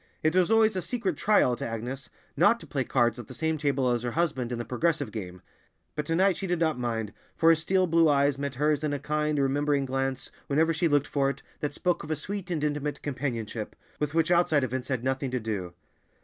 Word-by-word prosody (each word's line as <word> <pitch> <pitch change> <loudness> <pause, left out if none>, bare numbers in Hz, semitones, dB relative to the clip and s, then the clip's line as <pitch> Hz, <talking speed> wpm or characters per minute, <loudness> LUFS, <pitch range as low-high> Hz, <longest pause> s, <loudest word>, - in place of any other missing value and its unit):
It 155 +2 +2
was 185 0 +4
always 225 -2 +4
a 185 - -1
secret 205 -6 -2
trial 145 -10 +3
to - - -7
Agnes 120 +4 -5 0.3
not 175 +10 +4
to - - -11
play 135 -4 -2
cards 120 -1 +1
at 120 - -8
the 130 - -9
same 160 +4 -1
table 140 -3 +1
as 120 -1 0
her 120 0 -3
husband 135 -8 0
in 120 - -2
the 120 - -4
progressive 145 -1 0
game, 90 -5 -7 0.5
but 150 -1 -3
to 165 - +1
night 190 +1 +3
she 195 - -4
did 175 0 0
not 160 -5 0
mind, 115 -3 -2 0.2
for 165 0 +6
his 165 - +3
steel 185 +3 +2
blue 165 -2 +4
eyes 140 -1 +2
met 140 -1 -3
hers 150 +2 +1
in 150 -1 0
a 145 - -2
kind, 150 +1 -1
remembering 140 +1 +1
glance 135 0 -2 0.2
whenever 160 +3 +2
she 165 +2 +1
looked 145 -2 +2
for 140 -1 +1
it, 140 - -6 0.2
that 145 -1 -3
spoke 180 -1 0
of 150 - -9
a 155 - +1
sweet 195 +4 -5
and 160 -4 -2
intimate 150 -1 -2
companionship, 120 -6 -4 0.2
with 150 +1 -2
which 165 +1 +2
outside 170 -5 +3
events 130 0 -3
had 130 -3 -2
nothing 130 +1 -1
to 125 0 -1
do. 100 -6 -4
145 Hz, 235 wpm, -27 LUFS, 130-165 Hz, 0.5 s, for